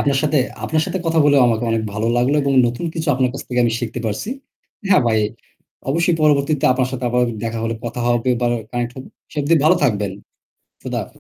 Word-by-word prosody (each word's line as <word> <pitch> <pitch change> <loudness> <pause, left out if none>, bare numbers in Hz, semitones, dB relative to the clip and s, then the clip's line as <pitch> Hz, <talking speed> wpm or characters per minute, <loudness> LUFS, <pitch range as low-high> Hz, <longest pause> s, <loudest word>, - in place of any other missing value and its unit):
আপনার 140 -1 +1
সাথে 150 -1 +2 0.3
আপনার 155 0 +1
সাথে 190 - -2
কথা 165 0 +1
বলে 145 -1 +4
আমাকেও 115 0 0
অনেক 115 -1 0
ভালো 110 +2 -2
লাগলো 125 +4 +2
এবং 140 0 +1
নতুন 120 +8 -3
কিছু 160 -1 -3
আপনার 130 -1 +1
কাছ 135 - -5
থেকে 125 -1 0
আমি 115 - +1
শিখতে 120 +1 -4
পারছি। 110 - -3 0.6
হ্যাঁ 185 - +5
ভাই, 110 -1 +2 0.7
অবশ্যই 170 +2 +2
পরবর্তীতে 150 0 +2
আপনার 130 0 0
সাথে 130 -1 -4
আবারও 125 0 +2 0.2
দেখা 115 0 -3
হলে 115 0 -1
কথা 120 +1 -4
হবে, 120 +1 +1
বা 120 - +1 0.2
connect 120 -1 -2
হব। 130 - -8 0.3
সে - - -14
অব্দি 160 +4 +3
ভালো 160 +4 +6
থাকবেন। 105 -7 +1 0.7
খোদা - - -3
হাফেজ। - - -9
125 Hz, 210 wpm, -19 LUFS, 120-150 Hz, 0.7 s, ভালো